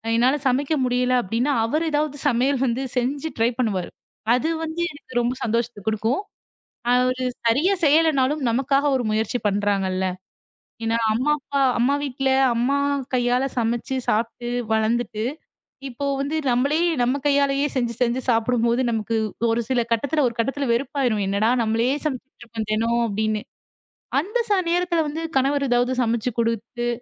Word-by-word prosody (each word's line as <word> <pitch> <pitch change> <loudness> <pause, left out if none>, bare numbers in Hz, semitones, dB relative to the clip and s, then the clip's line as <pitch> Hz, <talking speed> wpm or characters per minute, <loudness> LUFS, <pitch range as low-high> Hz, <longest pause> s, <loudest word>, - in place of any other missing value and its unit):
என்னால 250 +5 +3
சமைக்க 275 +4 +1
முடியல 250 0 +1
அப்படின்னா 230 +9 0
அவரு 305 +8 0
எதாவது 295 -1 0
சமையல் 260 +1 +2
வந்து 250 +2 -1
செஞ்சு 275 +5 -1
ட்ரை 225 +1 +3
பண்ணுவாரு. 200 -7 -1 0.5
அது 310 +6 0
வந்து 320 +2 -3
எனக்கு 255 -4 -4
ரொம்ப 240 +1 0
சந்தோஷத்தை 230 -1 -1
கொடுக்கும் 220 - 0 0.7
அவரு 255 +1 +2 0.2
சரியா 290 +12 +3
செய்யலைன்னாலும் 295 -2 +3
நமக்காக 275 +4 +2
ஒரு 245 - -1
முயற்சி 220 +3 0
பண்றாங்கள்ல. 195 -2 0 0.8
ஏன்னா 225 0 +1 0.2
அம்மா, 255 +7 +1
அப்பா, 280 0 -2 0.2
அம்மா 260 +4 +3
வீட்டுல 270 -1 -1 0.3
அம்மா 250 +4 +1 0.4
கையால 245 +1 +2 0.2
சமைச்சு 235 +3 -1
சாப்பிட்டு 235 +2 -1 0.2
வளர்ந்துட்டு 220 0 0 0.7
இப்போ 265 +3 -5
வந்து 285 +3 -2
நம்மளே 270 +5 +2 0.2
நம்ம 250 +3 +2
கையால 280 -1 +3 0.2
செஞ்சு 240 -2 0
செஞ்சு 245 +1 +2
சாப்பிடும்போது, 235 +1 +2
நமக்கு 225 0 -1 0.3
ஒரு 230 +1 +1
சில 250 -2 +2
கட்டத்துல 285 +6 +1
ஒரு 235 - -4
கட்டத்துல 270 +3 -1
வெறுப்பா 275 +4 -1
இருக்கும். 215 -4 +1
என்னடா 200 +3 +1
நம்மளே 225 +2 +1 0.2
சமைச்சிட்டு 270 -3 -5
இருக்கோம் 225 -2 -5
தினம் 230 +2 +1
அப்படின்னு 215 0 -1 0.8
அந்த 410 +10 -2
ச - - -2 0.2
நேரத்துல 350 -1 +1
வந்து 315 +3 -4 0.2
கணவர் 280 +1 +1
ஏதாவது 245 +1 +2
சமைச்சு 235 +1 0
கொடுத்து 235 +1 -1
245 Hz, 140 wpm, -23 LUFS, 230-280 Hz, 0.8 s, என்னால